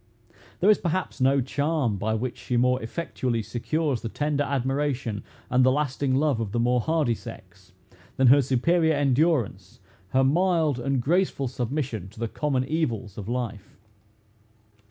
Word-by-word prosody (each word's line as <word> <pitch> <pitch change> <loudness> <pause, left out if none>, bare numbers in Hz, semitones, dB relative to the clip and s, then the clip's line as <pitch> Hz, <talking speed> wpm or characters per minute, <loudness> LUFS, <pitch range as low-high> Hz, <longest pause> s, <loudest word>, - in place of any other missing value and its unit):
There - - +5
is, 210 - +3
perhaps, 175 -4 -2
no 135 +1 +4
charm 140 -3 -1
by 110 +3 -1
which 120 +2 -3
she 125 - -2
more 125 +1 +2
effectually 120 -3 -3
secures 130 +5 -2
the 115 - -4
tender 145 +3 -1
admiration 135 -4 -1 0.2
and 125 0 +3
the 130 - +5
lasting 140 -1 0
love, 140 -3 +1
of 110 -3 -3
the 120 - 0
more 125 +1 +2
hardy 155 -3 +1
sex, - - -11 0.5
than 135 - +3
her 135 +3 +7
superior 160 +6 +2
endurance, 145 -2 0 0.3
her 130 +4 +2
mild 160 -1 +2
and 135 0 -1
graceful 170 -3 +1
submission 125 - -3
to 105 - -16
the 115 - -1
common 130 +1 -1
evils 125 - -2
of 105 0 -7
life. 120 -5 -4
130 Hz, 155 wpm, -25 LUFS, 120-150 Hz, 0.5 s, her